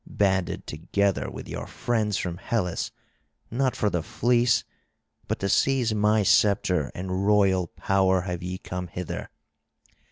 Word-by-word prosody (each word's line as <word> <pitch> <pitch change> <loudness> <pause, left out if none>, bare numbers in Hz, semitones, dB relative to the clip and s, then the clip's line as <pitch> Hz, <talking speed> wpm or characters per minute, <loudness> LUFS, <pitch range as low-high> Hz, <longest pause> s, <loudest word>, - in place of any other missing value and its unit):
Banded 95 -3 0
together 100 +5 -1
with - - -8
your - - -5
friends 110 -4 -1
from 85 -2 -3
Hellas, 95 -2 -2 0.6
not 130 +2 +1
for 105 - 0
the 85 - 0
fleece, 120 +5 +2 0.6
but - - -1
to 100 - 0
seize 125 +1 +2
my 105 0 +3
sceptre 95 -6 +3
and 95 +2 -2
royal 95 -4 +3
power 95 +1 +1
have 90 -1 -4
ye 90 +1 -4
come 90 -1 -5
hither. 90 0 -5
95 Hz, 135 wpm, -26 LUFS, 90-105 Hz, 0.6 s, my